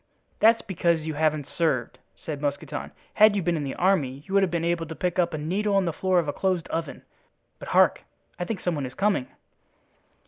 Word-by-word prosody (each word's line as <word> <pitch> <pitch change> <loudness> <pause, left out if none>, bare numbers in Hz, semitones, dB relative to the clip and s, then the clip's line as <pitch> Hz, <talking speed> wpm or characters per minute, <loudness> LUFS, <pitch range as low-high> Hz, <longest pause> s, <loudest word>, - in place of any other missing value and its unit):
"That's 225 +1 +5
because 170 -4 0
you 155 0 -4
haven't 155 -1 0
served," 150 -9 -1 0.2
said 150 -3 -6
Mousqueton. 145 -1 -3 0.2
"Had 215 -1 +6
you 195 - 0
been 175 0 +1
in 155 - -2
the 135 - -4
army 150 -8 +1
you 190 - -6
would 200 - +5
have 190 - +2
been 170 -1 -1
able 170 -1 -1
to 160 - -7
pick 180 +2 -1
up 175 -1 +2
a 155 - -3
needle 195 +7 -1
on 195 -1 +3
the 170 - -1
floor 185 +2 +1
of 170 -3 +2
a 145 - -1
closed 185 -3 -1
oven. 165 -2 -4 0.6
But - - -9
hark! - - +4 0.4
I 175 - -2
think 200 -1 -4
some 180 - 0
one 145 -4 -3
is 125 - -12
coming." 200 -10 +1
170 Hz, 220 wpm, -25 LUFS, 155-190 Hz, 0.6 s, Had